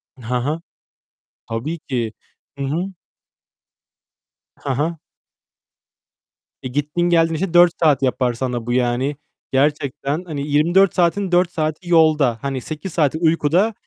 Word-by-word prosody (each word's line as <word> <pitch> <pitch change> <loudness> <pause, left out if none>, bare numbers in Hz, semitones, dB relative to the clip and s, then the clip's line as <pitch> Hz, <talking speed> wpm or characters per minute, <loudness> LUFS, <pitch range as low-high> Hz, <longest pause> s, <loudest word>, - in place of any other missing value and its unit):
Hı 125 -1 -4
hı. 150 +7 -2 0.9
Tabii 135 +9 -3
ki. 120 -7 -3 0.4
Hı 140 - -3
hı. 175 +8 -2 1.6
Hı 140 - -7
hı. 150 +6 -1 1.7
E, - - -3
gittiğin 150 +5 0
geldiğin 165 -1 +3
işte 175 +1 -2
4 175 0 +6
saat 145 -4 +4
yapar 125 -1 +1
sana 120 -1 -3
bu, 120 - -1
yani. 125 +3 0 0.4
Gerçekten, 145 +2 0
hani, 145 -4 -4
24 170 +6 +3
saatin 180 +2 +1
4 180 0 +3
saati 155 +2 -3
yolda, 155 -7 +4
hani, 135 -2 -3
8 155 +6 -6
saati 155 -2 +1
uykuda. 165 +5 +2
150 Hz, 125 wpm, -20 LUFS, 130-170 Hz, 1.7 s, 4